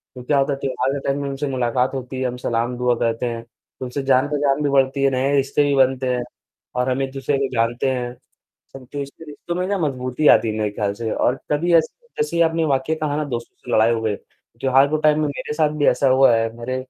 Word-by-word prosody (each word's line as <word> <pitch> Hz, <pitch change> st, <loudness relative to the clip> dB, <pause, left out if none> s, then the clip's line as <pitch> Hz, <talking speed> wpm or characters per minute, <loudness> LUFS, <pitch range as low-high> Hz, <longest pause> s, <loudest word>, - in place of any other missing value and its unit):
तो 125 Hz, -, -9 dB
क्या 145 Hz, +3 st, +1 dB
होता 140 Hz, +1 st, +2 dB
है 135 Hz, -, -6 dB
त्योहार 135 Hz, 0 st, -1 dB
के 140 Hz, -, -2 dB
टाइम 140 Hz, +1 st, 0 dB
में 140 Hz, -, -3 dB
उनसे 140 Hz, +1 st, -3 dB
मुलाकात 125 Hz, 0 st, 0 dB
होती 130 Hz, 0 st, -5 dB
है। 130 Hz, -, +1 dB
हम 125 Hz, -, -5 dB
सलाम 120 Hz, 0 st, -2 dB
दुआ 125 Hz, -1 st, +2 dB
कहते 115 Hz, +1 st, 0 dB
हैं। 115 Hz, -1 st, -4 dB, 0.4 s
उनसे 130 Hz, +2 st, -4 dB
जान-पहचान 140 Hz, +2 st, +2 dB
भी 145 Hz, -, +1 dB
बढ़ती 135 Hz, 0 st, +2 dB
है, 135 Hz, -, +5 dB
नए 135 Hz, +2 st, +1 dB
रिश्ते 140 Hz, +1 st, +2 dB
भी 140 Hz, -1 st, +1 dB
बनते 130 Hz, -1 st, +2 dB
हैं 125 Hz, -, -2 dB, 0.5 s
और 125 Hz, +1 st, 0 dB
हमें 135 Hz, +1 st, -1 dB
दूसरे 135 Hz, +1 st, -1 dB
भी 135 Hz, 0 st, 0 dB
जानते 115 Hz, +3 st, +1 dB
हैं, 125 Hz, -1 st, -3 dB, 0.7 s
तो 145 Hz, +3 st, -7 dB
इससे 140 Hz, +4 st, -9 dB
रिश्तों 155 Hz, +3 st, -6 dB
में 180 Hz, +1 st, -1 dB
ना 200 Hz, 0 st, 0 dB
मजबूती 135 Hz, -1 st, -1 dB
आती -, -, +6 dB
है 110 Hz, -, -3 dB
मेरे 105 Hz, -1 st, 0 dB
ख्याल 100 Hz, -1 st, -2 dB
से 110 Hz, +1 st, -4 dB
और 125 Hz, -, +1 dB
तभी 170 Hz, +4 st, +1 dB
ऐसे 160 Hz, -, +2 dB, 0.2 s
जैसे 170 Hz, +3 st, 0 dB
आपने 165 Hz, 0 st, +2 dB
वाकया 140 Hz, +2 st, 0 dB
कहा 150 Hz, -2 st, -1 dB
ना 150 Hz, -, 0 dB
दोस्तों 120 Hz, -4 st, -6 dB
से 125 Hz, -, -9 dB
लड़ाई 110 Hz, +1 st, +4 dB
हो 115 Hz, -, -2 dB
गई। 110 Hz, -2 st, 0 dB
त्योहार 130 Hz, +6 st, 0 dB
के 155 Hz, +2 st, 0 dB
टाइम 150 Hz, 0 st, +4 dB
में 150 Hz, -, +1 dB
मेरे 145 Hz, +1 st, -5 dB
साथ 155 Hz, 0 st, +2 dB
भी 145 Hz, -, +2 dB
ऐसा 140 Hz, -, +3 dB
हुआ 130 Hz, -2 st, +5 dB
है, 115 Hz, 0 st, 0 dB
मेरे 120 Hz, +2 st, -4 dB
135 Hz, 240 wpm, -21 LUFS, 125-145 Hz, 0.7 s, आती